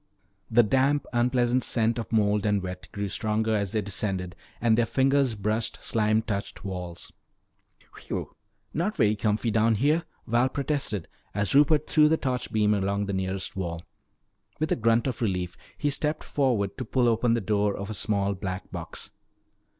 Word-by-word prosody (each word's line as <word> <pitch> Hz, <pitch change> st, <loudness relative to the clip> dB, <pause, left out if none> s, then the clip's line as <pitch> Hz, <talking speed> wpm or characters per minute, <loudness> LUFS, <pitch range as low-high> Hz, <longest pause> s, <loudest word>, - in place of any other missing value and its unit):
The 120 Hz, +1 st, +5 dB
damp, 135 Hz, +5 st, +2 dB
unpleasant 120 Hz, +1 st, +2 dB
scent 115 Hz, +1 st, +1 dB
of 115 Hz, -, -6 dB
mold 105 Hz, -2 st, +2 dB
and 105 Hz, -2 st, +1 dB
wet 90 Hz, 0 st, -6 dB
grew 100 Hz, 0 st, -3 dB
stronger 110 Hz, +2 st, 0 dB
as 100 Hz, -3 st, -1 dB
they 110 Hz, -2 st, 0 dB
descended, 95 Hz, -2 st, -2 dB, 0.2 s
and 115 Hz, -2 st, +3 dB
their 115 Hz, 0 st, +2 dB
fingers 135 Hz, -2 st, +2 dB
brushed 110 Hz, +2 st, -1 dB
slime 110 Hz, 0 st, +1 dB
touched 100 Hz, -1 st, -4 dB
walls. 90 Hz, -3 st, -6 dB, 0.8 s
"Phew! -, -, -5 dB, 0.4 s
Not 185 Hz, +7 st, -1 dB
very 105 Hz, 0 st, +3 dB
comfy 105 Hz, +2 st, 0 dB
down 110 Hz, +1 st, +3 dB
here," 150 Hz, +9 st, +2 dB, 0.2 s
Val 120 Hz, +3 st, +2 dB
protested 135 Hz, -, -2 dB, 0.3 s
as 105 Hz, -1 st, 0 dB
Rupert 150 Hz, +2 st, +5 dB
threw 150 Hz, -1 st, +5 dB
the 160 Hz, -, +3 dB
torch 125 Hz, -4 st, -2 dB
beam 105 Hz, -1 st, +3 dB
along 100 Hz, 0 st, 0 dB
the 100 Hz, -, -3 dB
nearest 95 Hz, 0 st, -3 dB
wall. 85 Hz, -3 st, -4 dB, 0.8 s
With 155 Hz, -, -1 dB
a -, -, +4 dB
grunt 115 Hz, 0 st, +2 dB
of 130 Hz, -4 st, -3 dB
relief 90 Hz, -4 st, -1 dB, 0.2 s
he 145 Hz, -, 0 dB
stepped 150 Hz, +2 st, -1 dB
forward 120 Hz, -8 st, 0 dB
to -, -, -1 dB
pull 125 Hz, +2 st, +2 dB
open 115 Hz, +1 st, +3 dB
the -, -, +1 dB
door 105 Hz, 0 st, 0 dB
of 100 Hz, +2 st, -5 dB
a -, -, -3 dB
small 100 Hz, -1 st, 0 dB
black 95 Hz, 0 st, -5 dB
box. -, -, -7 dB
110 Hz, 170 wpm, -27 LUFS, 100-125 Hz, 0.8 s, The